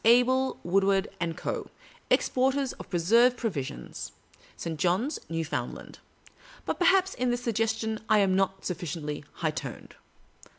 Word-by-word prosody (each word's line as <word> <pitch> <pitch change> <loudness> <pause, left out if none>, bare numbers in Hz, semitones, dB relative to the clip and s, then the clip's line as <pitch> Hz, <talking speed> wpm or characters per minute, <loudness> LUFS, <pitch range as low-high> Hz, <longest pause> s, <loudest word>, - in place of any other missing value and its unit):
Abel 250 +3 +4
Wood 190 +3 +3
ward 195 0 +2 0.3
& - - -19
Co., - - -3 0.4
exporters 265 +1 +2
of - - -11
preserved 230 +8 +4
provisions, 175 - -4 0.4
St. 160 -2 -4
John's, 190 - +1
New 165 0 -1
foundland. 155 - -5 0.7
But, - - -2
perhaps, 380 +1 +4
iu 250 - +1
this 245 0 -1
suggestion 225 -1 0
I 215 - +6
am 195 -2 +3
not 195 0 0
suflSciently 155 -4 -4
high 160 -2 -1
toned. 140 -5 -7
205 Hz, 135 wpm, -28 LUFS, 175-245 Hz, 0.7 s, I